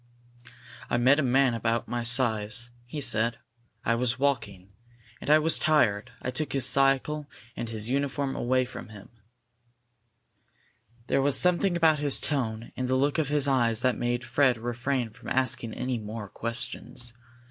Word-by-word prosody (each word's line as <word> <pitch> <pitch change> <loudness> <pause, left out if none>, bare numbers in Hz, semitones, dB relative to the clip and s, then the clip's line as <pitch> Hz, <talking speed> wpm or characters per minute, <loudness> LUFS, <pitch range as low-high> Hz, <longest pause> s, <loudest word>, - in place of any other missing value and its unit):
"I - - +1
met 130 +5 +4
a - - +3
man 130 -1 +3
of 115 - -3
about 115 0 0
my 120 0 -2
size," 115 -1 0 0.2
he 150 +5 -5
said. 115 -3 +2 0.5
"I 115 - +2
was 120 +1 0
walking. 105 -9 -2 0.5
And - - -6
I 155 - +7
was 160 +1 +2
tired. 110 -10 +2
I 125 - -2
took 155 +3 -2
his 135 -3 +1
cycle 140 +3 +1 0.3
and 115 - -5
his 110 -1 -1
uniform 140 +1 -1
away 130 +1 +1
from 125 - -9
him." 105 -2 -12 2.0
There 135 - +1
was 140 0 +4
something 180 0 +2
about 160 -3 +4
his 145 -2 +4
tone 115 -6 -2
and 130 - -2
the 130 - +1
look 140 +4 +1
in 155 - +1
his 145 0 +1
eyes 120 -4 +2
that 125 0 +2
made 120 0 -2
Fred 130 -3 +2
refrain 120 +1 -2
from - - -10
asking 125 -3 -1
any 125 -1 -2
more 105 0 -7
questions. 120 +1 -4
125 Hz, 165 wpm, -27 LUFS, 115-140 Hz, 2.0 s, I